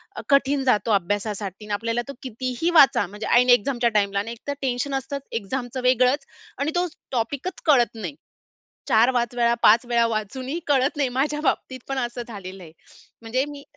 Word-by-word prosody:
अ, - - -5
कठीण 275 0 +3
जातो 230 -4 +2
अभ्यासासाठी 205 +1 -2
आणि 210 - -4
आपल्याला 230 +3 -1
तो 280 - -6
कितीही 255 +5 -2
वाचा, 270 - +5
म्हणजे 205 +3 -7
ऐन 250 +1 +4
एक्झामच्या 240 0 0
टाईमला 200 0 -1
आणि 225 +3 -4
एकतर 260 +5 -5
टेन्शन 265 +1 -1
असतंच 270 +1 -4 0.2
एक्झामचं 250 +4 -4
वेगळंच 255 +3 +3 0.3
आणि 285 +4 -1
तो 355 0 +1 0.2
टॉपिकच 265 +9 -3
कळत 250 -6 +4
नाही. 175 -10 -6 0.7
4-5 240 +1 +3
वेळा, 235 0 +3
5 230 +3 +6
वेळा, 235 -1 +2
वाचूनही 255 - -3
कळत 280 0 +2
नाही. 275 -3 +1
माझ्या 290 +4 -1
बाबतीत 260 -2 -1
पण 270 -1 -2
असं 240 0 -3
झालेलं 195 -4 -9
आहे. 160 - -13 0.5
म्हणजे 245 +4 0
मी 285 -1 -9
245 Hz, 170 wpm, -23 LUFS, 220-270 Hz, 0.7 s, 5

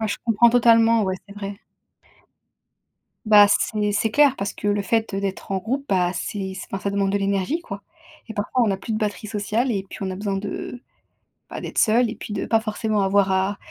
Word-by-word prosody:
Ouais, 220 - -1
je - - -2
comprends 235 +1 +5
totalement 230 -1 +4
ouais, 190 -1 -1
c'est 200 - -11
vrai. 200 0 -6 1.7
Bah, 210 -1 +7
c'est 210 0 0
c'est 220 +2 0
clair 285 -1 +4
parce 200 0 -3
que 205 - -5
le 205 0 +1
fait, 225 +1 -1
heu, 195 - -2
d'être 195 0 -4
en 190 - +1
groupe, 265 +8 -3
bah, 180 -2 +1
c'est 190 +1 -4 0.2
enfin 195 - -3
ça 200 - 0
demande 200 -1 0
de 200 - +1
l'énergie 200 - -1
quoi 200 -10 -8 0.5
et 220 - -7
parfois 210 +5 -1
on 220 - +1
a - - 0
plus 220 - -6
de - - 0
batterie 210 -1 -3
sociale 220 +4 -1
et 195 -2 -2
puis - - -9
on 190 -1 -2
a - - -5
besoin 200 -1 -2
de 205 +5 -6 0.7
bah, - - -6
d'être - - -8
seul 230 +1 +3
et - - -5
puis - - -9
de - - -3
pas 225 -1 +2
forcément 215 -1 -1
avoir 195 0 +2
à 190 +2 0
205 Hz, 225 wpm, -22 LUFS, 195-225 Hz, 1.7 s, Bah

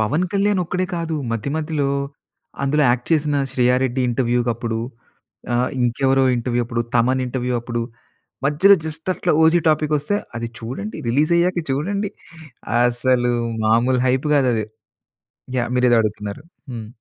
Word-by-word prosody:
పవన్ 150 +12 +1
కళ్యాణ్ 200 -1 +2
ఒక్కడే 180 +2 -1
కాదు, 165 -1 -2 0.2
మధ్య 115 +4 -3
మధ్యలో 150 -3 -1 0.7
అందులో 150 +2 +2
యాక్ట్ 120 0 -1
చేసిన 150 -2 +2
శ్రేయ 125 -1 +2
రెడ్డి 130 +1 -1
ఇంటర్వ్యూకప్పుడు 120 -2 0 0.8
ఆహ్, 125 +1 +1
ఇంకెవరో 135 +2 +2 0.2
ఇంటర్వ్యూ 120 0 -1
అప్పుడు, 120 0 -1
తమన్ 130 +2 +3
ఇంటర్వ్యూ 125 0 -2
అప్పుడు 120 -1 -3 0.6
మధ్యలో 155 +8 +6
జస్ట్ 160 +3 -4
అట్లా - - -1
'ఓజి' 160 +1 +5
టాపికొస్తే, 155 +4 +1 0.2
"అది 115 0 -3
చూడండి. 130 - -6
రిలీజ్ 145 +8 +2
అయ్యాక 180 +1 +1
చూడండి." 200 +9 -1 0.8
అసలు 120 0 +1 0.3
మామూలు 120 +3 +3
హైప్ 130 +4 +1
కాదు 135 -3 +3
అది. 110 -2 -1 0.9
యాహ్! 120 -1 0
మీరు 125 0 +3
ఏదో 120 - +5
అడుగుతున్నారు? 105 +3 -4 0.3
హ్మ్. 115 -3 -6
130 Hz, 140 wpm, -21 LUFS, 120-155 Hz, 0.9 s, మధ్యలో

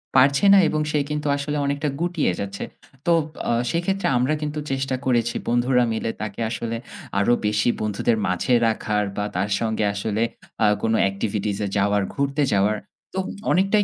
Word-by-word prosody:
পারছে 140 +6 +5
না - - +8
এবং 155 - 0
সে 150 - +2
কিন্তু 150 0 -2
আসলে 145 +1 -2
অনেকটা 140 +1 -1
গুটিয়ে 175 - +1
যাচ্ছে। 100 0 -4 0.4
তো 170 - +3 0.4
আ - - +3 0.2
সেক্ষেত্রে 190 +4 0
আমরা 130 +5 +2
কিন্তু 150 0 -3
চেষ্টা 135 0 -1
করেছি 120 -2 +1
বন্ধুরা 125 +1 +3
মিলে 110 0 -2
তাকে 105 -1 -5
আসলে 115 0 -3 0.4
আরো 110 +5 +3
বেশি 105 +2 +2
বন্ধুদের 110 +2 +1
মাঝে 90 +7 0
রাখার 105 -2 0
বা 105 - 0
তার 95 +3 0
সঙ্গে 110 -1 0
আসলে 105 +2 -2 0.4
আ - - +6 0.2
কোনো 110 0 +2
এক্টিভিটিস 100 0 -2
এ - - -1
যাওয়ার 100 0 +2
ঘুরতে 140 +1 0
যাওয়ার, 100 +2 +2 0.4
তো - - -5 0.3
অনেকটাই 195 +3 +3
120 Hz, 165 wpm, -23 LUFS, 105-145 Hz, 0.4 s, না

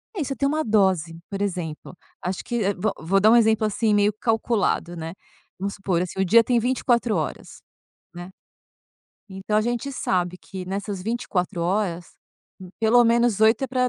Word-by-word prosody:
É 365 - -2
isso, 275 -1 -3
ter 275 - -1
uma 310 +3 +1
dose, 190 - +1
por 200 0 -5
exemplo, 180 -4 -4 0.3
acho 180 +1 -4
que, 240 -2 -2
eh, 200 +1 +1
vo 200 +3 -1
vou 180 +5 +1
dar 215 +3 +5
um - - +6
exemplo 220 -2 +3
assim, 215 +1 +1
meio 205 0 +3
calculado, 220 -5 0
né. 165 0 -6 0.5
Vamos 200 +1 -3
supor, 190 -4 -1
assim, 180 +1 -5
o 190 - +2
dia 230 +5 +6
tem 240 0 +2
24 240 -2 +1
horas, 155 -3 -5 0.5
né. 175 +1 -8 1.0
Então 190 +2 -3
a 215 - +4
gente 240 +4 -2
sabe 180 -6 -1
que 190 -1 -8
nessas 195 0 -4
24 195 -5 -2
horas, 180 -1 -1 0.5
hum, 185 - -10
pelo 230 +2 +5
menos 235 -2 +2
8 220 +3 +4
é - - -2
para 255 0 0
205 Hz, 180 wpm, -23 LUFS, 180-230 Hz, 1.0 s, um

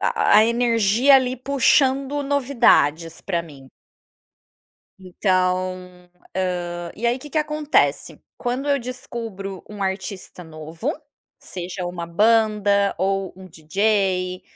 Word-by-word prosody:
a 215 +1 +4
energia 235 +2 +3
ali 255 -1 0
puxando 275 +2 +2
novidades 235 - +2
pra 170 -3 -2
mim. 140 -5 -14 1.3
Então, 185 -1 -2 0.2
hã, 175 -2 -3
e 235 +3 -2
aí 245 +2 +1
que 295 +2 -11
que 315 - 0
acontece. 300 -1 0 0.2
Quando 255 +3 -3
eu 280 -2 +2
descubro 230 -6 -7
um 210 -1 -9
artista 190 -1 -4
novo, 160 - -5 0.5
seja 180 0 -6
uma 175 -1 -5
banda 205 +1 +2
ou 195 -1 -1
um 190 0 -12
dj, 185 +2 -1
195 Hz, 105 wpm, -22 LUFS, 180-245 Hz, 1.3 s, a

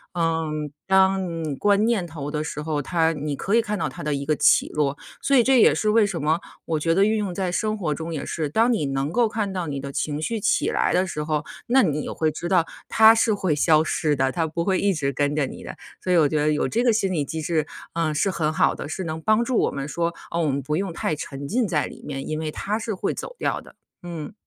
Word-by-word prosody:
嗯， 160 -3 -1 0.2
当 190 0 +4
嗯 165 -4 -4
观 205 +1 +3
念 225 -6 +1
头 150 -3 -6
的 150 0 -2
时 150 - -5
候， 150 -1 -2
它 165 +2 +1
你 150 -1 -3
可 195 +9 0
以 230 - +5
看 210 -2 -3
到 - - 0
它 135 - -9
的 150 0 -1
一 140 0 -3
个 155 - +1
起 - - +4
落， 145 -2 -1 0.2
所 275 - +2
以 245 - +6
这 260 +1 +4
也 - - +6
是 215 - 0
为 215 0 +5
什 190 -6 -3
么， 155 +3 +1 0.3
我 160 -2 -1
觉 165 +2 +1
得 195 +3 +4
运 220 +1 +2
用 200 -4 -2
在 185 0 -2
生 215 +4 -1
活 165 -7 -1
中 165 +2 -5
也 145 - -4
是， 155 -3 -2
当 225 +10 +3
你 185 -10 0
能 135 +2 -1
够 240 +2 +3
看 210 -2 -2
到 180 -3 -3
你 140 -2 -3
的 140 0 -6
情 150 +2 -2
绪 225 +7 -2
起 - - +1
来 - - +1
的 185 - +3
时 150 -3 -3
候， 150 -1 -1 0.2
那 265 +3 +5
你 150 -5 0
也 - - -5
会 155 -1 0
知 165 +3 -5
道 180 -3 +3 0.2
它 220 0 +7
是 225 -1 +3
会 185 -6 0
消 155 +1 +4
失 155 -2 0
的， 135 -1 +1
它 165 +1 0
不 170 +2 -2
会 190 -1 +2
一 200 -1 +2
直 145 -5 -1
跟 145 +2 0
着 150 -2 +1
你 - - -9
的。 - - -7 0.3
所 185 - -1
以 180 - +5
我 155 -3 +5
觉 155 - -1
得 150 +1 +2
有 150 - +1
这 235 +2 0
个 245 - +4
心 195 -3 0
理 155 -4 0
机 160 +3 -4
制， 155 -1 0 0.3
呃， 165 -2 0
是 150 +6 +1
很 155 -3 0
好 - - +2
的， - - -6
是 190 - -4
能 160 -1 -4
帮 215 +5 +3
助 250 -1 0
我 - - +1
们 140 0 -4
说， 170 +2 -1 0.2
哦， 170 - 0
我 160 - +1
们 140 0 0
不 150 +3 -2
用 190 +2 -2
太 155 - -1
沉 140 -1 -6
浸 235 - +1
在 155 -5 0
里 - - -10
面， 135 -2 -5
因 155 0 -2
为 155 -1 -3
它 205 +7 -2
是 225 0 -3
会 185 - -2
走 - - -7
掉 - - -1
的， - - -17 0.3
嗯。 165 -4 -6
165 Hz, 295 characters per minute, -24 LUFS, 150-195 Hz, 0.3 s, 它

